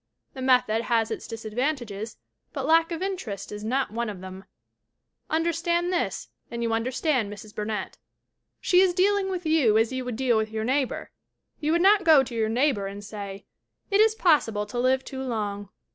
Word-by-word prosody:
The 265 - -8
method 250 -4 +3
has 225 -2 +1
its - - -5
disadvantages 225 -1 -3 0.4
but 275 -3 -3
lack 330 +2 +4
of 335 +2 -3
interest 365 - -4
is 210 0 -6
not 260 +3 0
one 235 +1 -2
of 200 -3 -7
them! 190 +1 -9 0.8
Understand 340 +2 0
this 345 - -2 0.2
and 235 0 -4
you 230 -1 0
understand 255 0 0
Mrs. 210 +1 -10
Burnett. 210 0 -4 0.6
She 360 0 +4
is 370 -2 +3
dealing 390 +1 +2
with 365 -2 -4
you 295 -9 +4
as 225 +3 +2
you 260 0 -2
would 250 -2 -4
deal 245 -2 +2
with 220 0 0
your 220 0 -3
neighbor. 260 +2 -1 0.5
You 305 0 0
would 340 +1 +2
not 400 0 +5
go 315 -5 +7
to 245 - -8
your 220 -1 0
neighbor 240 -4 +1
and 200 +1 -8
say: 200 -1 -7 0.5
"It 400 +1 +5
is 440 0 +4
possible 230 - +2
to 225 +4 -5
live 260 +1 +2
too 265 -1 -6
long." 205 -5 -3
250 Hz, 185 wpm, -26 LUFS, 215-320 Hz, 0.8 s, go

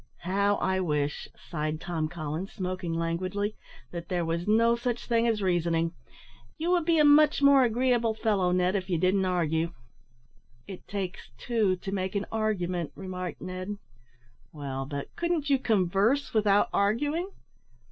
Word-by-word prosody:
"How 200 +3 +2
I 190 -1 0
wish," 150 -4 -1
sighed 155 -1 -4
Tom 160 -3 -2
Collins, 160 +3 -5
smoking 185 -2 -3
languidly, 185 +5 -2 0.4
"that 170 -1 -7
there 175 -2 0
was 170 +2 -2
no 230 +2 +4
such 240 0 -3
thing 235 -1 +2
as 220 -3 0
reasoning. 170 -2 +1 0.6
You 335 +3 -1
would 350 -3 +2
be 335 -1 +3
a 300 - +5
much 295 0 +5
more 280 -1 +7
agreeable 240 -1 +2
fellow, 200 -5 +1
Ned, 180 +1 +2
if 190 -1 -2
you 175 - +1
didn't 185 +3 +2
argue." 165 -2 0 0.9
"It 190 -2 -10
takes 195 -2 -5
two 220 - +1
to 190 +2 -7
make 190 0 -2
an 200 - 0
argument," 185 -7 -1
remarked 185 -3 -6
Ned. 185 +3 -5 0.7
"Well, 135 -3 -5
but 140 -1 -6
couldn't 340 -4 -1
you 270 - +4
converse 215 +5 +1
without 205 -2 +3
arguing?" 290 - +1
190 Hz, 150 wpm, -28 LUFS, 175-230 Hz, 0.9 s, more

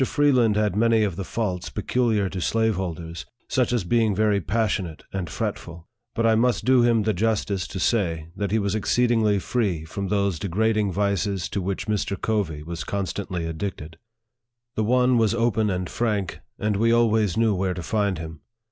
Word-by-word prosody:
Freeland 130 -6 +3
had 105 -3 +1
many 115 0 +3
of 100 -5 -1
the 95 - -4
faults 95 -1 -3
peculiar 115 -5 0
to 95 -1 -5
slave 110 +5 +1
holders, 85 -2 -5 0.2
such 125 -2 +1
as 120 -5 +1
being 110 +2 +2
very 105 -1 +2
passionate 95 -4 -1
and 95 -4 -3
fretful; 85 +4 -5 0.3
but 115 - +1
I 115 - +5
must 120 +2 +2
do 130 -1 +5
him 115 -2 +3
the 110 +1 +1
justice 100 -1 0
to 95 - -6
say, 85 -7 0
that 100 0 -2
he 110 - +1
was 100 -2 0
exceed 120 +3 +1
ingly 110 -4 +3
free 95 -8 -1
from 100 +5 -4
those 100 -4 0
degrading 105 +2 +1
vices 100 0 0
to 100 - -2
which 95 +1 -3
Mr. 105 -2 -1
Covey 95 -9 -1
was 85 +1 -5
constantly 95 -2 -3
addicted 80 -1 -5 0.7
The 110 - -1
one 125 +1 +3
was 110 0 +2
open 115 -2 +1
and 90 -1 -2
frank, 105 -5 -2 0.2
and 105 -1 0
we 115 +2 +3
always 110 -4 +2
knew 115 -2 +3
where 95 -1 -1
to 90 - -5
find 100 0 0
him. 80 -1 -7
105 Hz, 185 wpm, -24 LUFS, 90-115 Hz, 0.7 s, I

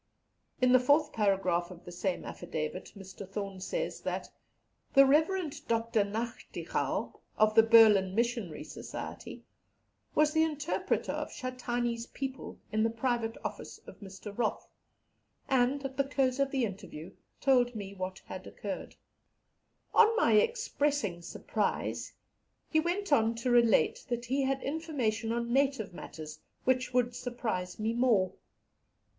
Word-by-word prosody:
In 255 -1 +4
the 255 - +7
fourth 290 +4 +3
paragraph 190 -5 +1
of 180 -1 -12
the 175 - -8
same 180 +1 -2
affidavit, 170 0 -5
Mr. 190 0 -10
Thorne 195 -1 -5
says - - -3
that - - -4 0.6
"the 275 0 +9
Rev. 315 +3 +2
Dr. 230 -1 +2
Nachtigal, 225 +4 -3 0.2
of 215 0 +4
the 225 - +8
Berlin 215 -4 +6
Missionary 230 -8 -1
Society, - - -8 0.7
was 305 0 +4
the 320 - +4
interpreter 310 0 0
for - - -16 0.2
Shatane's 240 -2 -2
people, 270 -1 -6
in 215 0 +1
the 225 - +3
private 230 -1 -1
office - - -6
of - - -12
Mr. 200 +1 -9
Roth, 225 -2 -1 0.8
and, 265 +2 +2
at 265 0 -5
the 275 - +3
close 270 -1 0
of 275 0 +2
the 265 -3 +1
interview, 185 -4 -8 0.3
told 245 -3 +3
me 200 -2 -6
what 185 -1 -5
had 185 0 -8
occurred. 200 -2 -6 1.0
On 455 0 +6
my 230 - +4
expressing 285 - +1
surprise, 170 - -2 0.6
he 315 - +4
went 350 +1 0
on 225 -3 +3
to 235 +2 -1
relate 235 - +4
that 240 0 -2
he 265 +4 0
had 270 0 0
information 265 -8 -1
on 235 0 -1
native 270 -8 +1
matters 155 -3 -8 0.2
which 255 -1 +1
would 245 -1 +1
surprise 220 -8 -3
me 220 +1 -1
more. 230 -7 +3
235 Hz, 140 wpm, -31 LUFS, 200-270 Hz, 1.0 s, the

